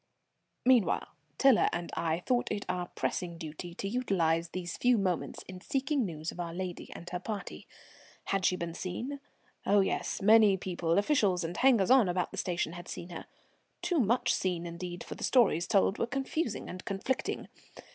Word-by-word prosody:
Meanwhile 250 -5 +3 0.3
Tiler 270 -4 +5
and 175 0 -4
I 165 +1 0
thought 245 -1 +1
it 205 -1 -2
our 180 -1 -2
pressing 175 -2 -3
duty 165 +1 -7
to 195 - -4
utilize 170 -8 +1
these 175 0 -5
few 250 -1 +3
moments 185 -4 -1
in 185 -1 -10
seeking 270 -1 0
news 160 -1 -5
of - - -12
our 170 -1 -4
lady 180 -1 -5
and 170 - -9
her 180 - -2
party. 205 +1 -6 0.6
Had 195 -1 -1
she 180 - +3
been 170 -2 -4
seen? 235 +12 -4 0.4
Oh, 200 0 +4
yes, 190 - -1
many 210 -1 +6
people, 175 -3 -1
officials, 200 - +2
and 165 +2 -4
hangers 245 -5 +4
on 255 -8 +6
about 180 0 -1
the - - -8
station 175 -2 -1
had 175 0 -9
seen 170 - -7
her. 170 - -8 0.6
Too 355 -2 +1
much 240 +1 +2
seen 175 -2 -1
indeed, 175 +1 -6
for - - -7
the - - -8
stories 195 -9 +3
told 195 -1 +3
were 230 - +1
confusing 270 -1 -2
and 185 - -7
conflicting. 200 +7 -2
185 Hz, 175 wpm, -31 LUFS, 175-230 Hz, 0.6 s, many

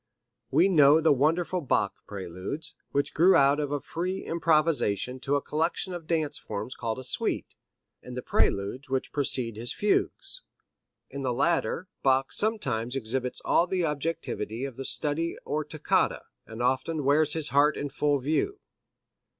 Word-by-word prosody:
We - - +4
know 150 -4 +6
the 160 -1 +4
wonderful 165 +6 +1
Bach 115 -8 +1
Preludes, 100 - -6 0.2
which 140 0 0
grew 180 +4 +5
out 140 +1 +4
of 145 -1 -2
a 145 - 0
free 180 +7 -4
improvisation 155 -8 +1
to 135 +2 -2
the 145 - +2
collection 165 +5 -1
of 170 -3 -7
dance 160 -3 0
forms 105 +4 -5
called 115 0 -3
a 130 - -7
suite, 125 - -1 0.5
and 125 0 -9
the 125 - -4
preludes 110 +8 0
which 130 0 -2
precede 125 -6 0
his 120 +2 -2
fugues. 390 - -1 0.7
In 140 - -5
the 130 -2 0
latter 170 +5 0
Bach 135 0 +2
sometimes 135 - 0
exhibits 125 +1 -2
all 175 - +3
the 180 -2 0
objectivity 140 -6 -3
of 135 -3 -7
the 135 +1 -6
study 155 +5 0
or 155 +1 -1
toccata, 150 0 0 0.2
and 110 +2 -5
often 130 +5 0
wears 145 +2 +3
his 160 -2 -1
heart 145 +3 +3
in 145 - -3
full 145 +1 +1
view. 160 - -1
145 Hz, 160 wpm, -27 LUFS, 130-165 Hz, 0.7 s, know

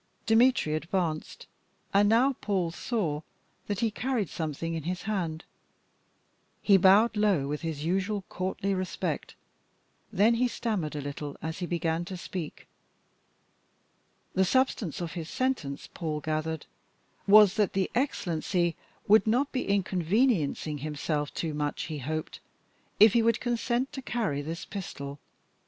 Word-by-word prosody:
Dmitry 225 -7 +4
advanced, 160 0 -2 0.5
and 205 +1 +5
now 250 +5 +4
Paul 190 -8 -1
saw 170 -6 -2 0.5
that 205 -2 -2
he 230 -2 +2
carried 245 -4 -1
something 160 +1 -3
in 165 - -2
his 175 +3 -4
hand. 175 -7 -2 1.1
He 200 - +5
bowed 200 +5 +5
low 200 -10 +2
with 150 +1 -3
his 160 -3 -4
usual 195 +3 0
courtly 190 +1 -2
respect. 185 -1 -3 0.8
Then 210 +3 +4
he 245 +2 +2
stammered 205 -11 -2
a 145 - -3
little 145 0 -6
as 160 +1 -5
he 175 - -3
began 165 -1 -1
to 185 0 -6
speak. 175 -3 -6 1.7
The 190 - +3
substance 215 - +1
of 170 -2 -3
his 165 -3 -6
sentence, 250 - -2
Paul 155 -3 -3
gathered, 155 +1 -2 0.6
was 205 -1 +8
that 210 -3 +1
the 190 -1 0
Excellency 175 - 0 0.3
would 215 +2 +6
not 255 +6 +2
be 255 - -2
inconveniencing 185 - +1
himself 150 0 -2
too 160 -2 -3
much, 150 0 -2
he 155 -3 -5
hoped, 155 +4 -4 0.6
if 215 0 +8
he 235 - +4
would 230 0 +2
consent 240 +1 -1
to 270 - -5
carry 215 - -1
this 165 +3 -5
pistol. 140 -8 -6
185 Hz, 140 wpm, -28 LUFS, 155-215 Hz, 1.7 s, was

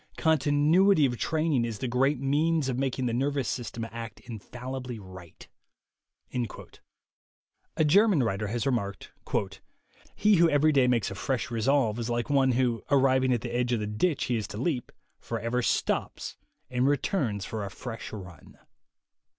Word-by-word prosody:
Continuity 155 +4 +4
of 125 -2 0
training 155 -5 +1
is 115 -2 -3
the 130 - -3
great 130 +3 +1
means 145 +2 +1
of 125 0 -2
making 130 -1 -1
the 120 - 0
nervous 135 +1 0
system 115 -2 -4
act 115 -2 -7
infallibly 125 +2 -7
right." 95 -4 -12 2.3
A 160 - +3
German 190 - +5
writer 105 -1 -1
has 115 +4 -2
remarked: 100 -7 -2 1.0
"He 210 -2 +4
who 170 0 +5
every 150 +1 +4
day 135 -4 +4
makes 120 -6 +1
a - - -4
fresh 120 +6 -2
resolve 120 -1 +1
is 115 0 -3
like 120 +4 -1
one 135 -2 +4
who, 120 -2 +1
arriving 130 -2 +3
at 120 -3 +1
the 120 0 -5
edge 125 0 +1
of 115 - +1
the 105 - -2
ditch 120 +10 0
he 125 - 0
is 105 -2 -3
to - - -8
leap, 130 0 -2 0.3
forever 115 +2 -2
stops - - -1 0.4
and 125 +1 +2
returns 135 - 0
for 110 -2 -4
a 100 - -4
fresh 115 +1 -7
run." 90 -5 -11
125 Hz, 160 wpm, -28 LUFS, 115-145 Hz, 2.3 s, German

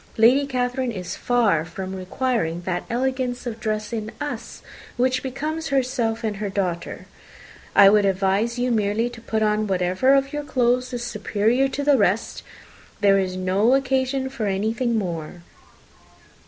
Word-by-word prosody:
Lady 255 +6 +5
Catherine 250 -1 -1
is 185 -5 -5
far 225 -10 +2
from 185 +3 -6
requiring 185 -3 -2
that 180 0 -3
elegance 255 0 -1
of 230 -2 -5
dress 215 0 -3
in 215 -1 -3
us - - -6 0.3
which 255 +1 +1
becomes 310 +5 -4
herself 250 -5 0
and 210 -2 -3
daughter. 180 -4 -3 0.7
I 195 - +9
would 205 +1 +5
advise 195 +4 +1
you 250 0 0
merely 220 +2 0
to 235 -1 -11
put 220 -1 -1
on 215 0 +1
whatever 185 +8 +2
of 275 +1 0
your 295 - -2
clothes 250 -2 +1
is 245 -1 -4
superior 225 +3 +1
to 275 +1 -4
the 285 -2 +4
rest - - 0 0.6
there 195 -1 +5
is 185 -1 -2
no 195 +7 +2
occasion 265 0 0
for 230 -6 -3
anything 220 +4 0
more. 170 -3 -4
230 Hz, 150 wpm, -23 LUFS, 195-255 Hz, 0.7 s, I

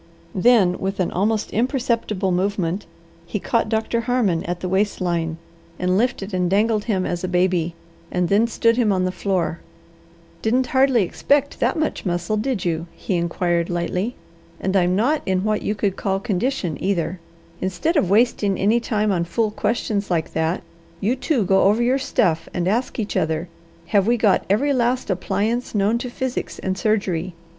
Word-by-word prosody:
Then, 195 -3 +4
with 195 +1 -3
an 180 - 0
almost 210 +3 0
imperceptible 230 -5 0
movement, 185 0 -1 0.4
he 210 - -2
caught 230 +2 0
Doctor 225 +1 0
Harmon 230 -9 +1
at 175 0 -3
the 185 - -3
waist 195 +3 0
line, 170 -3 -1 0.4
and 180 0 +1
lifted 210 -2 0
and 180 -1 +1
dangled 210 +2 +2
him 195 -5 0
as 175 0 -3
a - - 0
baby, 180 -2 +1 0.4
and 180 -1 +1
then 205 +5 +3
stood 230 0 +2
him 230 -4 +3
on 185 -1 +1
the 185 - 0
floor. 185 -3 -1 0.8
"Didn't 250 +4 +2
hardly 260 -4 +4
expect 285 +9 0
that - - +1
much 310 -1 -1
muscle, 175 +2 -1
did 215 -2 -1
you?" 165 0 -1
he - - -3
inquired 170 0 0
lightly. 180 +6 -2 0.4
"And 190 +1 -1
I'm 180 -1 +3
not 265 +10 +2
in 190 0 +1
what 215 0 0
you 210 - -1
could 200 -2 -1
call 195 -1 -1
condition, 200 - -2
either. 185 -2 -1 0.4
Instead 190 - -1
of 205 - +2
wasting 205 -2 +2
any 215 +5 +3
time 215 -3 0
on 175 -3 +1
fool 215 +5 0
questions 210 -2 -1
like 165 -3 -1
that, 160 +2 -1 0.4
you 220 +7 +1
two 260 - 0
go 190 +1 +4
over 210 +4 +3
your 255 +3 +2
stuff 165 - 0
and 175 0 0
ask 230 +6 0
each 215 -3 -3
other, 160 +2 0 0.4
have 200 +1 +2
we 240 +1 +3
got 215 -4 +2
every 275 +9 +2
last 245 -3 +1
appliance 215 +6 -1
known 210 +3 +2
to 250 - -4
physics 255 +1 -4
and 190 0 -2
surgery? 190 -5 -1
200 Hz, 175 wpm, -22 LUFS, 180-230 Hz, 0.8 s, Then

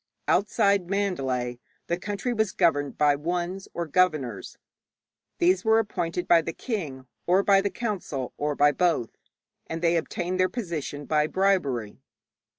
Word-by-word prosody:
Outside 200 -2 +2
Mandalay 135 -12 -1 0.3
the 170 - 0
country 205 +6 -3
was 220 -4 0
governed 145 -6 +1
by 145 -1 +4
wuns 175 +5 -3
or 170 - -3
governors. 155 -6 0 0.8
These 180 +2 +3
were 220 0 +4
appointed 180 -5 -2
by 170 -1 +6
the 165 +1 -5
king, 155 - -5 0.2
or 185 +3 +4
by 195 -1 +5
the 200 - 0
council, 190 - -4
or 150 0 -2
by 145 +1 +5
both, 165 -7 +1 0.6
and 165 - -4
they 170 0 +3
obtained 180 +2 -3
their 185 0 +3
position 160 - -5
by 150 0 +2
bribery. 150 - 0
175 Hz, 145 wpm, -26 LUFS, 145-195 Hz, 0.8 s, by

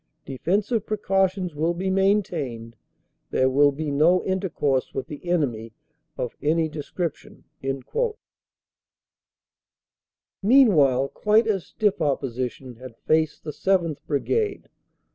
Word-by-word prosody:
Defensive 200 - -1
precautions 195 -3 0
will 160 +3 0
be 190 +2 -2
maintained. 170 - 0 0.5
There 130 0 +2
will 145 +2 +5
be 150 +1 -4
no 160 +6 +3
intercourse 165 -8 -1
with 130 - -2
the 150 +5 -8
enemy 120 -10 -1 0.4
of 125 - -4
any 160 +2 +2
descrip 155 +2 -3
tion. - - -18 3.0
Meanwhile 165 - +5
quite 215 +2 +2
as 200 -5 -1
stiff 205 -5 0
opposition 130 -3 -2
had 125 -2 -11
faced 155 -1 0
the 155 - -5
7th. 170 -3 0
Brigade. 415 - -1
160 Hz, 105 wpm, -24 LUFS, 135-195 Hz, 3.0 s, will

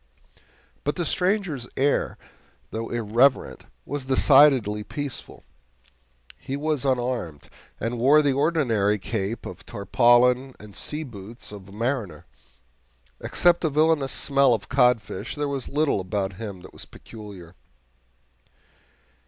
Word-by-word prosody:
But 145 - -1
the 175 - -2
stranger's 180 - -1
air, 140 +2 +1 0.5
though 115 +1 -4
irreverent, 120 +4 +1 0.2
was 145 -2 -4
decidedly 130 -5 +4
peaceful. 140 +1 -6 1.0
He 135 - -5
was 150 -2 -1
unarmed, 120 - -2 0.3
and 115 +2 -3
wore 145 +5 +5
the 140 -2 +2
ordinary 130 -9 +1
cape 105 +2 -4
of - - -9
tarpaulin 120 +6 +3
and 105 -1 -13
sea 150 +9 -3
boots 115 -3 -10
of 100 -2 -11
a - - -13
mariner. 115 -1 -3 0.9
Except 175 0 +2
a 160 - +2
villainous 150 -2 +2
smell 140 -2 +2
of 95 -3 -8
codfish, 125 -7 +1
there 145 -1 -2
was 140 -2 -4
little 145 -5 +1
about 95 +1 -2
him 100 -2 -7
that 90 - -14
was - - -10
peculiar. 100 -6 -12
125 Hz, 120 wpm, -24 LUFS, 105-145 Hz, 1.0 s, wore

